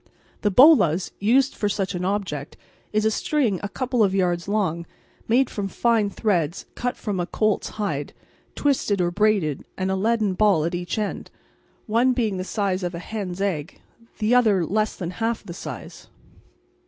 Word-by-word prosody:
The 210 - +2
bolas, 195 - +5
used 255 +7 +3
for 205 - -1
such 195 -1 -2
an 180 0 -3
object, 185 -7 -3 0.3
is 215 0 +1
a 220 - +3
string 230 - 0
a 205 - -4
couple 250 +1 0
of 195 -1 +2
yards 175 -2 0
long, 180 -5 -1 0.4
made 250 +3 +3
from 200 -4 -4
fine 225 0 +1
threads 180 -6 -1
cut 245 0 -3
from 205 -4 -3
a 175 - -1
colt's 215 -2 0
hide, 155 -9 -2 0.4
twisted 265 -8 +1
or 175 -1 +1
braided, 200 -7 +1
and 190 0 -1
a - - +1
leaden 215 0 +1
ball 190 -5 +3
at 170 - -2
each 175 +2 -3
end, 210 -2 -3 0.6
one 235 +4 +3
being 220 -6 0
the 185 - -3
size 195 -1 -1
of 175 -1 -3
a - - -4
hen's 190 0 -5
egg, 165 -7 -2 0.4
the 220 +2 +1
other 215 -8 +4
less 215 +5 0
than 175 -2 -5
half 225 +4 -2
the 170 - -8
size. - - -8
200 Hz, 175 wpm, -23 LUFS, 180-220 Hz, 0.6 s, bolas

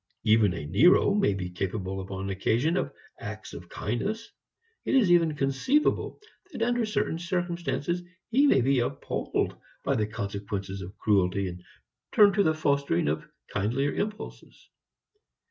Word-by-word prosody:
Even 110 -4 +4
a 75 - -5
Nero 125 - +5
may 200 - +2
be 95 -2 -3
capable 95 +1 -3
upon 95 0 -5
occasion 120 - +1
of - - -1 0.3
acts - - -7
of - - -9
kindness. - - -3 0.5
It - - 0
is 220 -9 +5
even 165 -3 +4
conceivable 140 - +1 0.3
that 230 - -2
under 240 -1 +1
certain 165 -6 -1
circumstances 175 -1 -2 0.3
he 275 +5 +5
may 135 - +5
be 135 +1 +3
appalled 120 - -2 0.3
by - - +1
the 105 -1 0
consequences 100 -2 -4
of 95 +2 -9
cruelty, 100 -2 +2
and 90 0 -8 0.5
turn 205 -2 +7
to 205 - +3
the 160 -4 +2
fostering 140 - +1
of 75 - -3 0.2
kindlier 125 +8 0
impulses. 210 +1 -6
125 Hz, 145 wpm, -27 LUFS, -, 0.5 s, turn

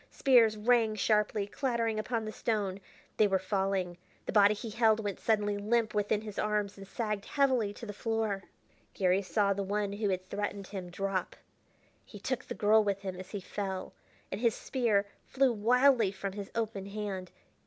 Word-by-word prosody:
Spears 235 -5 +4
rang 225 0 +3
sharply, 210 -1 +1
clattering 230 -1 -1
upon 225 0 -2
the 215 - -4
stone.... 205 -4 -1 0.4
They 215 - +5
were 195 -1 +2
falling. 190 -2 -1 0.3
The - - -3
body 205 0 +5
he 220 +1 -6
held 220 -1 +3
went 205 -3 -3
suddenly 205 -2 +1
limp 220 +1 +1
within 210 0 +1
his 210 -2 -6
arms 210 -1 0
and 195 -1 -11
sagged 210 -3 -3
heavily 260 -7 +2
to 230 - -9
the 205 - -6
floor.... 220 -3 -2 0.5
Garry 185 0 +2
saw 200 +1 +1
the 200 - -3
one 200 +1 -1
who 205 0 -1
had 185 -1 -2
threatened 200 0 -3
him 185 -3 -6
drop; 190 0 -2 0.7
he 210 - -12
took 255 +4 -3
the - - -6
girl 215 0 +4
with 200 -1 -1
him 190 -2 -4
as 185 0 -9
he 205 -1 -5
fell, 190 0 -4 0.4
and - - -4
his 235 -3 +3
spear 225 -6 +1 0.2
flew 265 -2 +2
wildly 240 0 +4
from 195 0 -5
his 200 -1 -6
open 220 -4 -2
hand. 200 -3 -4
210 Hz, 180 wpm, -31 LUFS, 195-225 Hz, 0.7 s, They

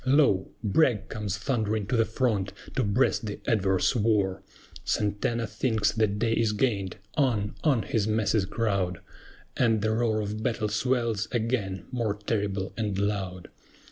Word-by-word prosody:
Lo! 130 -8 +3
BRAGG 110 -1 +2
comes 105 -2 -3
thundering 110 -2 -1
to 115 - -1
the 115 -1 +4
front, 110 -4 0 0.2
to 130 - +2
breast 110 +2 +1
the 105 - -5
adverse 100 -2 +2
war! 105 -4 +1 0.4
SANTANA 105 +3 0
thinks 110 -1 0
the 110 0 +2
day 110 +3 0
is 115 -2 +2
gained! 105 -5 0 0.2
On, 115 -8 +1
on 135 -8 +3
his 110 -6 0
masses 110 -2 +2
crowd, 100 -4 -1 0.6
And 110 -4 +2
the 110 - +2
roar 110 -1 +1
of 105 +1 -3
battle 110 -1 -1
swells 115 -1 0
again 110 -6 -1
more 115 -5 -1
terrible 100 -2 -2
and 105 -4 -2
loud. 95 -3 -2
110 Hz, 145 wpm, -27 LUFS, 100-115 Hz, 0.6 s, the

